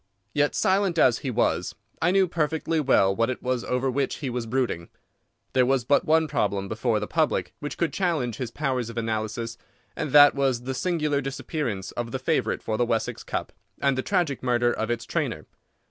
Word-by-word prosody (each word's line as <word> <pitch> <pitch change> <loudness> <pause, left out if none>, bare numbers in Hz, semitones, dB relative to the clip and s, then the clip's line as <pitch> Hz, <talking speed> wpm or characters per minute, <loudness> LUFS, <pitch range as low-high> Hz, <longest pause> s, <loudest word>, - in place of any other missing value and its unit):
Yet, 145 0 +1
silent 190 -2 +2
as 125 -6 +4
he 135 - -4
was, 115 -7 0 0.3
I 165 - +3
knew 190 0 +4
perfectly 160 -1 0
well 100 -9 +3
what 115 +3 +1
it 130 - -4
was 125 -1 -1
over 125 +1 -1
which 135 +1 -1
he 135 -4 -4
was 120 -1 -3
brooding. 120 -9 -1 0.6
There 130 - +4
was 130 -1 +1
but 145 - +3
one 160 0 +3
problem 100 -7 -1
before 110 +1 0
the 105 - -3
public 155 +5 0
which 145 - -5
could 170 - 0
challenge 155 - 0
his 125 -3 -3
powers 130 -3 -2
of 115 - -9
analysis, 115 +1 -3 0.4
and - - -3
that 145 0 +8
was 135 -3 0
the 130 +1 -3
singular 150 0 0
disappearance 130 - -3
of 120 -1 -4
the 130 - -1
favourite 130 -3 0
for 110 - -2
the 120 - +2
Wessex 115 -1 -1
Cup, - - -4 0.3
and 140 -1 +2
the 130 - 0
tragic 170 -5 0
murder 120 -1 +2
of 110 - -3
its 120 -1 -2
trainer. - - -2
130 Hz, 195 wpm, -25 LUFS, 115-150 Hz, 0.6 s, that